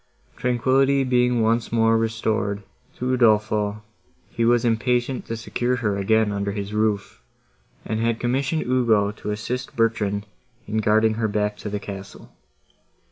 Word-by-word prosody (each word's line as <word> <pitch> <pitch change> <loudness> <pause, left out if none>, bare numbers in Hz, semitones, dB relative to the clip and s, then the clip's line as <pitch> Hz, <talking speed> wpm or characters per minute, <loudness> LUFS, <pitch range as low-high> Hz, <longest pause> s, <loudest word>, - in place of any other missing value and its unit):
Tranquillity 135 +3 +2
being 125 -2 +2
once 115 +1 +1
more 115 0 +3
restored 110 -2 -1 0.3
to 125 - -5
Udolpho, 105 -3 +2 0.5
he 115 - -1
was 120 +1 +3
impatient 120 +2 0
to 115 - -4
secure 120 +3 -1
her 110 -5 -1
again 110 +2 +2
under 100 0 -2
his 100 0 -5
roof, 105 -2 -1 0.6
and 110 0 -2
had 115 0 0
commissioned 135 +6 0
Ugo 115 -5 +2
to 105 - -7
assist 125 +5 -4
Bertrand 105 -3 0 0.4
in 110 - -2
guarding 110 +1 +3
her 110 - +2
back 105 0 -1
to 105 - -6
the 105 0 -3
castle. 100 -1 -9
110 Hz, 140 wpm, -23 LUFS, 105-120 Hz, 0.6 s, more